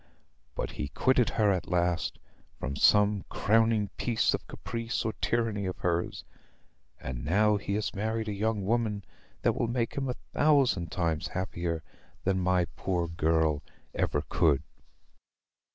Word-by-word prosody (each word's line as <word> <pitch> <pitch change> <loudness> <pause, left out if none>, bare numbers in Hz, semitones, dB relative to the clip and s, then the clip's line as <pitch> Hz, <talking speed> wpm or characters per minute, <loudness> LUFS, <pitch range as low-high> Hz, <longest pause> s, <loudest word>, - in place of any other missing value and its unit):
But - - -3
he 75 - -4
quitted 125 - +2
her 105 -3 +3
at 90 -4 -1
last, 90 -1 0 0.4
from 70 +2 -3
some 105 +5 +4
crowning 110 -1 +2
piece 115 -3 +2
of - - -4
caprice 115 0 -4
or 110 - 0
tyranny 110 -4 0
of 90 - -4
hers; 85 -1 -1 0.8
and 60 -1 -5
now 105 +7 +3
he 100 0 -3
has 105 +2 -1
married 110 +2 -2
a 105 - -1
young 105 0 -1
woman 105 -3 0 0.4
that - - +3
will 120 - -1
make 120 0 -1
him 135 -2 -2
a 125 - -2 0.2
thousand 140 - +3
times 85 -4 0
happier 85 -3 -3 0.4
than 95 0 +1
my 90 -1 +2
poor 90 -3 -1
girl 80 -2 +1 0.3
ever 75 - 0
could." 80 -6 +3
100 Hz, 145 wpm, -29 LUFS, 85-110 Hz, 0.8 s, some